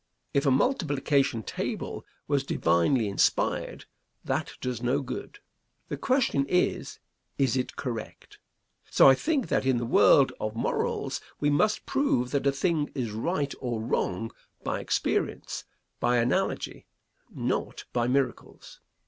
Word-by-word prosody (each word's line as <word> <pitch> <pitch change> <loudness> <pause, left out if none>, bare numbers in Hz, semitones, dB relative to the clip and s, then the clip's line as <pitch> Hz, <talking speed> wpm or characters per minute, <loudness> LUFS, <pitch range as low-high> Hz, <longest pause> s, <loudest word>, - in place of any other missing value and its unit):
If 140 +1 +2
a - - +6
multiplication 140 - +1
table - - -4 0.2
was 140 -2 +1
divinely 105 +2 +2
inspired, 100 - 0 0.4
that - - -1
does 125 -2 -3
no 125 +3 +1
good. 135 - -6 0.5
The - - -2
question 255 - +2
is, 180 - 0 0.4
is 130 -4 +2
it 125 -1 -2
correct? 115 -5 -6 0.5
So - - +6
I 135 - +9
think 280 - 0
that - - +2
in 130 -2 +2
the 120 - -1
world 135 +3 +5
of 110 +1 -3
morals, 115 - -1 0.2
we 145 0 +2
must 210 +9 +2
prove 125 - +1
that 140 -1 +1
a - - +5
thing 150 +1 0
is 120 -5 -2
right 140 - -1
or 120 -3 -2
wrong 115 0 -1 0.3
by - - -1
experience, - - -1 0.3
by 120 0 +2
analogy, 120 +1 -1 0.4
not - - -3
by 120 -1 +1
miracles. 130 -1 -2
135 Hz, 135 wpm, -28 LUFS, 120-145 Hz, 0.5 s, I